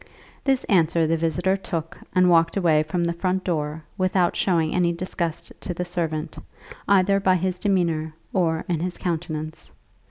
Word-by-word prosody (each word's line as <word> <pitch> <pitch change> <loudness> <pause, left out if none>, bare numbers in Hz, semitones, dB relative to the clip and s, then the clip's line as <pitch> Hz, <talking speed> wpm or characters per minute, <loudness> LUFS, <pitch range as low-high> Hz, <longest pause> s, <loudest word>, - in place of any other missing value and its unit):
This 270 -2 +2
answer 165 -3 +3
the 165 +1 +2
visitor 170 +4 +1
took 170 -3 -4 0.2
and 180 0 +5
walked 165 +1 +4
away 165 -5 +4
from 170 +3 -1
the 170 0 0
front 185 +2 -1
door 155 -2 -2 0.2
without 185 -1 +2
showing 165 -4 +1
any 175 -1 +2
disgust 170 -1 -3
to 175 - -5
the 180 - -2
servant, 165 -4 -3 0.5
either 195 0 +4
by 190 -1 +3
his 185 0 -1
demeanour 170 -6 0 0.2
or 165 -3 +1
in 170 -3 0
his 180 +2 -3
countenance. 160 -3 -4
170 Hz, 160 wpm, -24 LUFS, 160-185 Hz, 0.5 s, and